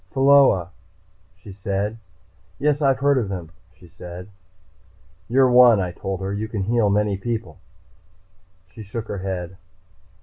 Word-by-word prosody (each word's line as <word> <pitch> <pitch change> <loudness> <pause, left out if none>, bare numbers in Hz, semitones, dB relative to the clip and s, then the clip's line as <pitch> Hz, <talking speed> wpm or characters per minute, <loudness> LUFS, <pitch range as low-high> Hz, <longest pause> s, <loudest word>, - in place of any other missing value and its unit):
"Pheola," 135 -10 +4 0.7
she 95 +2 -13
said. 100 +2 -3 0.6
"Yes, 150 +1 0
I've 135 -2 +3
heard 140 0 +2
of 105 -5 -3
them," 90 -4 -6 0.3
she - - -17
said. 90 +2 -11 1.0
"You're 130 +2 +4
one," 120 -3 +7
I 90 -2 -2
told 95 +1 -5
her. 95 +1 -3
"You 105 +2 -3
can 110 -3 -4
heal 115 0 +1
many 105 0 +1
people." 115 -1 -5 1.1
She 110 - -11
shook 110 +2 -7
her 100 - -4
head. 95 -1 -5
105 Hz, 140 wpm, -22 LUFS, 95-120 Hz, 1.1 s, one